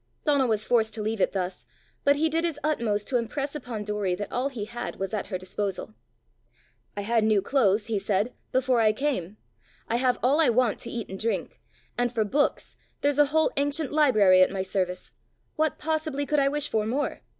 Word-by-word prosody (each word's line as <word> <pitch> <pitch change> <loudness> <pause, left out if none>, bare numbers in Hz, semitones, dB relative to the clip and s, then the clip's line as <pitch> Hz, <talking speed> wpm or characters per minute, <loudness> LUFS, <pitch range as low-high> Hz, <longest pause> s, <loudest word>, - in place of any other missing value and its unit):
Donal 285 -4 +3
was 215 -2 0
forced 220 -3 +2
to 220 - -4
leave 215 -1 -2
it - - +2
thus, 185 -1 -4 0.4
but 285 0 +4
he 310 +3 +2
did 325 +1 0
his 330 -4 -2
utmost 230 -9 0
to 255 - +2
impress 275 +5 -3
upon 240 -7 -5
Doory 205 -3 -1
that 205 - -5
all 255 +3 0
he 230 -7 -5
had 240 +2 -6
was 195 +2 -4
at 210 - -2
her 185 - -3
disposal. 185 - -4 1.0
"I - - -1
had 225 +2 +1
new 215 -1 +3
clothes," 210 -3 +2
he 220 -3 -1
said, 205 +5 0 0.2
"before 255 -2 +2
I 215 -1 +4
came; 215 - -2 0.5
I 235 - 0
have 250 0 +2
all 280 +6 +4
I 315 - +4
want 240 -2 +2
to 235 - -6
eat 230 -3 -4
and 190 0 -7
drink; 230 0 -2 0.4
and 245 -1 +1
for 225 -3 +1
books, 285 +8 0 0.3
there's 285 0 +1
a 295 - +7
whole 315 +2 +2
ancient 285 +1 0
library 215 -12 +5
at 185 - +6
my 190 -1 -2
service! 185 -1 -3 0.4
what 315 0 0
possibly 310 -2 -2
could 300 +1 +1
I 275 0 +3
wish 295 0 0
for 215 -4 -1
more? 275 +6 -2
235 Hz, 205 wpm, -26 LUFS, 205-285 Hz, 1.0 s, a